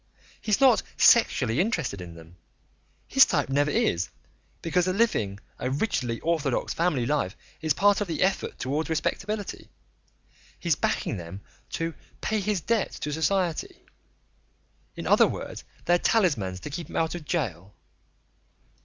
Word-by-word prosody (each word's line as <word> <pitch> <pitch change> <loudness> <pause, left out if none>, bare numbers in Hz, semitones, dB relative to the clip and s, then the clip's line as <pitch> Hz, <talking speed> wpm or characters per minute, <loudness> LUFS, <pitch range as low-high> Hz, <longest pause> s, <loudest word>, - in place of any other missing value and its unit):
He's 215 -1 +1
not 260 -4 +6 0.2
sexually 130 - +5
interested 165 - 0
in 85 -2 -9
them 85 +2 -14 0.7
his - - +7
type - - +1
never 145 +2 +2
is, 85 -10 +1 0.5
because 175 +2 +1
living 185 - +1 0.2
a 125 - -1
rigidly 130 - -1
orthodox 155 -6 0
family 165 -8 +1
life 135 -8 -1 0.2
is 155 -2 +1
part 205 +1 +4
of 205 - -1
the 165 - 0
effort 190 +1 0
towards 145 +5 -2
respectability. 200 +6 -3 0.9
He's - - +2
backing - - -1
them 85 +3 -8 0.3
to 165 0 -2 0.3
'pay 220 - 0
his 205 -2 -1
debt 225 +2 +1
to 150 - -4
society' 170 +1 -1 1.1
in - - -6
other - - +6
words, - - -6 0.2
they're 175 +1 +4
talismans 130 - +1
to 150 - -7
keep 165 +1 -5
him - - -9
out 160 -1 +1
of 175 -2 -6
jail." 105 - -3
160 Hz, 140 wpm, -26 LUFS, 120-190 Hz, 1.1 s, his